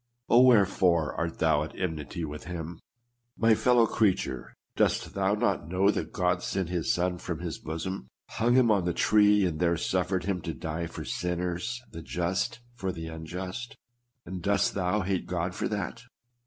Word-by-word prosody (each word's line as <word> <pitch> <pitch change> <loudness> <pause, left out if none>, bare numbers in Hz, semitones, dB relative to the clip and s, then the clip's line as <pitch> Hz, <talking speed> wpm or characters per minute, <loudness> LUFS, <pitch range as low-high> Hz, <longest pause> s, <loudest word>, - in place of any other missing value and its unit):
Oh, 120 - +7
wherefore 95 -9 +4
art 85 0 -3
thou 80 -2 +3
at 75 - -6
enmity 80 -2 -3
with 75 0 -7
Mm? 85 -1 -6 0.6
My 115 0 +5
fellow 120 +1 +4
creature, 95 - 0 0.2
dost - - +1
thou 100 +1 +1
not 105 - 0
know 95 +3 +3
that - - -3
God 90 0 +1
sent 95 -2 -2
his 90 -2 0
Son 90 0 0
from 85 -2 -4
his 85 -1 -5
bosom, 80 -2 -5 0.2
hung 120 +2 +1
him 125 -3 +5
on 100 -4 +2
the 85 -1 -1
tree, 105 -1 +4
and 80 -4 -2
there 85 -1 +2
suffered 90 +2 0
Mm 95 -1 -1
to 80 -1 -4
die 80 +2 -4
for - - -7
sinners, 90 +7 -2
the 85 - -7
just 90 +8 -2
for 95 -6 -3
the 80 -2 -6
unjust? 90 +8 -6 0.5
And 95 -1 -6
dost 100 +2 +2
thou 95 +2 0
hate 95 -1 -1
God 90 +1 -2
for - - -2
that 105 -1 -3
90 Hz, 175 wpm, -28 LUFS, 85-100 Hz, 0.6 s, Oh